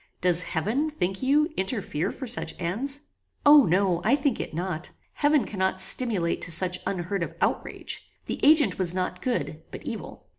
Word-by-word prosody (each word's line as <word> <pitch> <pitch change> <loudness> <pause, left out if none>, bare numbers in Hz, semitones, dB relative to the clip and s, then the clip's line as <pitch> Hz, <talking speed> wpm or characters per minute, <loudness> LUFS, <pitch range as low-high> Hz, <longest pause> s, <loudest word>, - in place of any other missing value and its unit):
Does 180 -1 +4
heaven, 220 - -1
think 195 -11 -3
you, 300 +4 +2
interfere 190 - -2
for 265 - -8
such 225 -9 -2
ends?" 250 +12 -2 0.4
"O 290 -4 +7
no; 180 0 +1
I 235 +7 +4
think 275 -4 -1
it - - -5
not. 175 0 -4 0.2
Heaven 295 -1 +2
cannot 190 -2 -2
stimulate 190 -3 +3
to 180 - +1
such 180 +2 +2
unheard 185 +1 -3
of 170 - -4
outrage. - - -2 0.2
The - - -4
agent 290 - +4
was 180 -1 +5
not 185 -1 -3
good, 160 - -3
but - - -9
evil." - - -7
190 Hz, 170 wpm, -25 LUFS, 175-270 Hz, 0.4 s, O